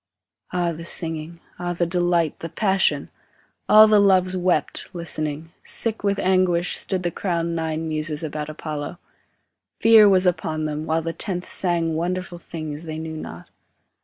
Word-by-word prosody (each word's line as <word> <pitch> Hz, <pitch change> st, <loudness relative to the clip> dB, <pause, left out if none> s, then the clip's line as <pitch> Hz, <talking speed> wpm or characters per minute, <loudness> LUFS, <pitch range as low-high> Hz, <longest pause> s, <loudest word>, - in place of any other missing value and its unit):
Ah 175 Hz, -1 st, 0 dB
the 165 Hz, 0 st, -7 dB
singing, 165 Hz, 0 st, 0 dB, 0.2 s
ah 175 Hz, 0 st, -2 dB
the 175 Hz, 0 st, 0 dB
delight, 175 Hz, -2 st, 0 dB
the 165 Hz, -, -6 dB
passion! 195 Hz, +1 st, +1 dB, 0.6 s
All 215 Hz, 0 st, +9 dB
the 215 Hz, -1 st, +5 dB
Loves 185 Hz, -2 st, +3 dB
wept, 180 Hz, 0 st, 0 dB
listening; 155 Hz, -2 st, -3 dB
sick 225 Hz, -2 st, 0 dB
with 200 Hz, -1 st, +1 dB
anguish, 180 Hz, -2 st, +2 dB
Stood 185 Hz, -2 st, -3 dB
the 175 Hz, -, -1 dB
crowned 170 Hz, -2 st, -2 dB
nine 160 Hz, 0 st, -2 dB
Muses 155 Hz, 0 st, -1 dB
about 150 Hz, -1 st, -4 dB
Apollo; 155 Hz, +1 st, -6 dB, 0.8 s
Fear 225 Hz, -2 st, +7 dB
was 190 Hz, -1 st, +4 dB
upon 160 Hz, -3 st, 0 dB
them, 155 Hz, +1 st, -4 dB
While 160 Hz, +1 st, 0 dB
the 165 Hz, 0 st, -3 dB
tenth 180 Hz, -2 st, -3 dB
sang 170 Hz, -3 st, 0 dB
wonderful 175 Hz, +2 st, -3 dB
things 155 Hz, -2 st, -6 dB
they 155 Hz, -1 st, -5 dB
knew 160 Hz, 0 st, -6 dB
not. 85 Hz, -, -9 dB
170 Hz, 155 wpm, -23 LUFS, 160-185 Hz, 0.8 s, All